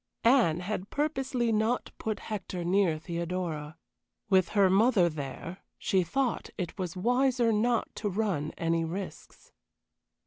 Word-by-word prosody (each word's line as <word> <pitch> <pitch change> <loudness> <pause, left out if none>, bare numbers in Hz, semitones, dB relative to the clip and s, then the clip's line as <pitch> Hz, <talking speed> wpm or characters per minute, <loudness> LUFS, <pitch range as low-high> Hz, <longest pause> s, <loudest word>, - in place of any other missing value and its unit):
Anne 230 -10 +4
had 195 +1 -4
purposely 270 -5 0
not 220 +3 0
put 215 -1 -3
Hector 190 -4 -4
near 180 -3 +3
Theodora; 170 -2 -4 0.5
with 185 -2 +4
her 200 -1 +6
mother 195 -1 +4
there 155 +5 -6 0.2
she 190 - +2
thought 250 +7 -1
it 180 -3 -4
was 180 -1 -3
wiser 245 +2 +2
not 230 +2 +1
to 210 - -1
run 185 -7 -1
any 165 0 +1
risks. 185 +4 -7
190 Hz, 130 wpm, -29 LUFS, 170-230 Hz, 0.5 s, her